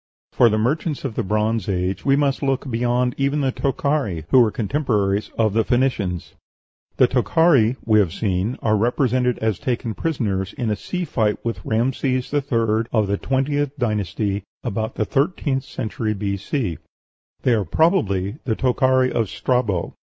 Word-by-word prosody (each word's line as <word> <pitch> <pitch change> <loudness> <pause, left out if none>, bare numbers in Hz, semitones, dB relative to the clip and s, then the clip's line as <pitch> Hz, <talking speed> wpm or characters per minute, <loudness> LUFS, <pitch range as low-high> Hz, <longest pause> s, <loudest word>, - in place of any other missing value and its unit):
For 120 - +5
the 110 - +1
merchants 145 +6 -1
of 130 - -3
the - - -1
Bronze 105 +1 0
Age 95 0 -1
we 135 -1 +3
must 140 -1 +1
look 135 -1 -1
beyond 120 +1 +1
even 140 +2 +1
the 135 -1 +1
Tokhari, 135 - -1
who 130 - +7
were 115 -3 +5
contemporaries 105 -5 0
of 110 -3 +2
the 115 +1 +3
Phoenicians. 110 -8 -1 0.6
The 130 - +6
Tokhari, 130 -2 +3
we 110 -1 +4
have 95 -6 +2
seen, 100 +4 -1
are 110 -1 +3
represented 125 +2 +1
as 110 -5 0
taken 120 -2 -2
prisoners, 100 - -2
in 120 -4 -2
a - - +1
sea 180 - -4
fight 110 -8 0
with 115 - -3
Rhamses 130 +2 -1
III., 115 -6 +1
of 110 -3 +2
the 100 +1 -1
twentieth 145 +1 -1
dynasty, 105 -3 -1 0.2
about 110 -1 -3
the 110 - 0
thirteenth 135 - 0
century 110 0 -3
B.C. 100 - -2 0.6
They 125 - +3
are 110 -3 +1
probably 105 - +1
the 115 -4 -1
Tochari 130 0 +2
of 115 -4 0
Strabo. 110 -9 -1
115 Hz, 160 wpm, -21 LUFS, 105-135 Hz, 0.6 s, who